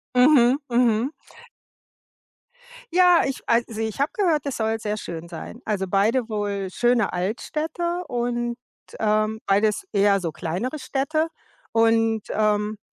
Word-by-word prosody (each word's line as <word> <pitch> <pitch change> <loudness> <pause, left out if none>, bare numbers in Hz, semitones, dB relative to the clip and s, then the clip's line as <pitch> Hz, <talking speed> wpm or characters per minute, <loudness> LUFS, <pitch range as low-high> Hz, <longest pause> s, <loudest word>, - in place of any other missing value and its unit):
Mhm, 250 -1 +6
mhm. 240 +1 +2 1.8
Ja, 360 -1 +6
ich 270 - -3
also 230 -1 +1
ich 220 +1 -3
habe 280 +2 +1
gehört, 345 - +1
es 280 - -3
soll 225 0 -1
sehr 210 -1 -2
schön 170 -4 -7
sein, 170 +7 -8
also 200 -3 -1
beide 220 +5 +2
wohl 205 -2 -2
schöne 240 0 +2
Altstädte 315 - -2
und, 240 -1 -2 0.4
ähm, 215 0 +1
beides 205 - +2
eher 200 -1 +3
so 165 -2 -2
kleinere 185 - -4
Städte 295 +4 -1 0.5
und, 225 -1 +3
ähm, 210 0 0
225 Hz, 125 wpm, -23 LUFS, 210-260 Hz, 1.8 s, Mhm